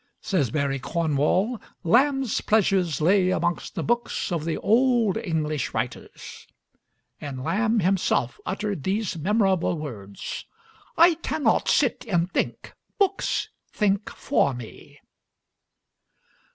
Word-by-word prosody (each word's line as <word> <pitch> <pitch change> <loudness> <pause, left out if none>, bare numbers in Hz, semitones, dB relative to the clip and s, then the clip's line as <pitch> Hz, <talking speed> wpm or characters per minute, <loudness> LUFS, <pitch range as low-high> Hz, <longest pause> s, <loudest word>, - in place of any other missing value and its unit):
Says 160 - 0
Barry 140 -2 -1
Cornwall: 170 - 0 0.2
"Lamb's 265 - +2
pleasures 190 -7 +2
lay 185 +3 +4
amongst 175 -1 -1
the - - -2
books 240 -4 -1
of 165 -3 -2
the 165 - -1
old 235 -3 +3
English 155 -6 -2
writers," - - -6 0.7
and 135 -3 -6
Lamb 220 - +1
himself 175 -9 +1
uttered 200 -3 -3
these 200 +2 -1
memorable 190 0 +1
words: 105 -10 -7 0.5
"I 340 +1 +7
cannot 290 -7 +1
sit 265 -5 +2
and 175 -3 0
think - - -2 0.2
books 395 -1 0 0.2
think 205 -1 0
for 140 - 0
me." 120 -3 -11
190 Hz, 110 wpm, -25 LUFS, 155-220 Hz, 0.7 s, I